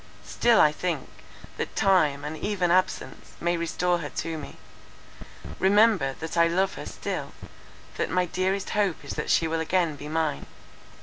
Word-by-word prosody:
Still 235 -2 +3
I 150 - +6
think, 165 -2 -3 0.5
that - - -4
time, 155 -8 +3
and 150 +1 -4
even 185 -1 -1
absence, 185 +1 -1
may 175 +1 0
restore 175 +1 0
her 150 -3 -5
to 165 +2 -4
me. 150 -3 -8 1.0
Remember, 200 -7 +4
that 160 +1 -5
I 170 0 +5
love 190 +3 +1
her - - -8
still, - - -5 0.6
that - - -1
my 180 0 +1
dearest 185 +3 -1
hope 200 -5 0
is - - -6
that - - -4
she 165 - +3
will 165 0 -1
again 165 -1 +1
be 145 +1 -9
mine. 155 - -1
170 Hz, 165 wpm, -26 LUFS, 160-185 Hz, 1.0 s, I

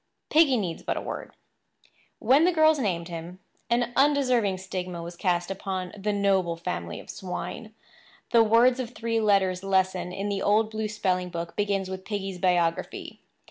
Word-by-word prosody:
Piggy 300 -5 +5
needs 180 -6 -3
but - - -2
a - - -2
word. - - -7 0.8
When 265 +7 +4
the 360 - +4
girls 315 -2 +4
named 175 -8 -1
him, 170 +1 -7 0.3
an 240 0 +1
undeserving 255 -8 +3
stigma 180 -2 -5
was 170 +1 -8
cast 175 -1 0
upon 190 -1 -4
the 210 +1 -2
noble 195 -4 +1
family 85 - -4
of - - -13
swine. 210 +3 -6 0.6
The 230 - +6
words 235 +3 +4
of 245 -1 -5
three 230 0 -1
letters 195 -4 +2
lesson 185 -2 +1
in 195 +2 -4
the 200 -1 -2
old 215 +1 +2
blue 220 0 -2
spelling 185 -4 -1
book 170 -1 -5
begins 200 -2 0
with 190 0 -6
Piggy's 195 -3 -4
biography. 175 -2 0
195 Hz, 165 wpm, -26 LUFS, 180-225 Hz, 0.8 s, The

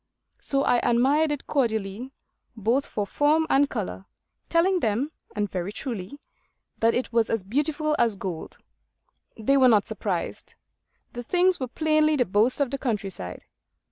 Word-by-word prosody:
So 275 0 0
I 245 - +3
admired 275 +7 +2
it 290 - -4
cordially 220 -3 -1 0.5
both 230 +6 +1
for 205 - -2
form 300 +8 +2
and 280 +1 +4
colour, 200 -4 -5 0.4
telling 360 +3 +3
them, 235 +4 0 0.2
and 210 0 0
very 185 0 -4
truly, 220 +1 -6 0.6
that 230 +1 +3
it 245 -1 -2
was 230 -1 +2
as 225 -4 -1
beautiful 300 +7 0
as 230 -3 +3
gold. 185 -4 -6 0.8
They 255 +5 +2
were 260 -1 +6
not 210 -3 +4
surprised. - - -4 0.6
The 240 - -5
things 360 +8 +2
were 260 - -2
plainly 310 +3 +2
the 250 -4 +2
boast 215 +7 +2
of 275 -3 0
the 275 - -3
countryside. 195 - -4
245 Hz, 150 wpm, -25 LUFS, 210-290 Hz, 0.8 s, were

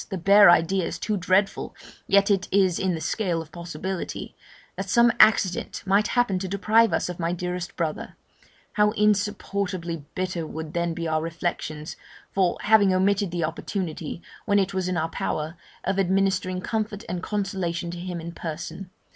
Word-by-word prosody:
the 195 - -3
bare 200 +3 +7
idea 175 +2 +4
is - - -3
too 215 - -1
dreadful, 190 +1 +1 0.3
yet 200 +1 +4
it 190 -2 +1
is 190 -3 +3
in 185 -2 0
the - - -4
scale 180 -1 -1
of 160 -1 -8
possibility), 170 +2 -5 0.4
that 195 -1 -5
some 235 +4 +5
accident 200 -4 +3
might 200 +2 +3
happen 205 -7 +2
to 190 - -3
deprive 215 +4 +3
us - - 0
of 180 -1 -6
my 165 0 0
dearest 180 +1 -4
brother: 160 -3 -3 0.6
how 210 -1 +4
insupportably 200 -5 -1
bitter 185 -3 -2
would 160 0 -6
then 170 -1 -1
be 165 -1 -3
our 155 0 0
reflections, 165 -2 -4 0.3
for 190 -2 +1
having 210 -2 +5
omitted 195 +1 +2
the 170 -1 -2
opportunity, 165 0 -4 0.2
when 200 - +3
it 195 0 +1
was 190 -1 -1
in 185 -1 -1
our 160 0 0
power, 155 0 -3 0.3
of 195 +1 0
administering 190 -1 +1
comfort 215 0 -3
and 175 0 -3
consolation 185 -4 -2
to 175 - -7
him 180 -1 -5
in 170 +1 -6
person. 170 +2 -6
185 Hz, 170 wpm, -25 LUFS, 170-200 Hz, 0.6 s, bare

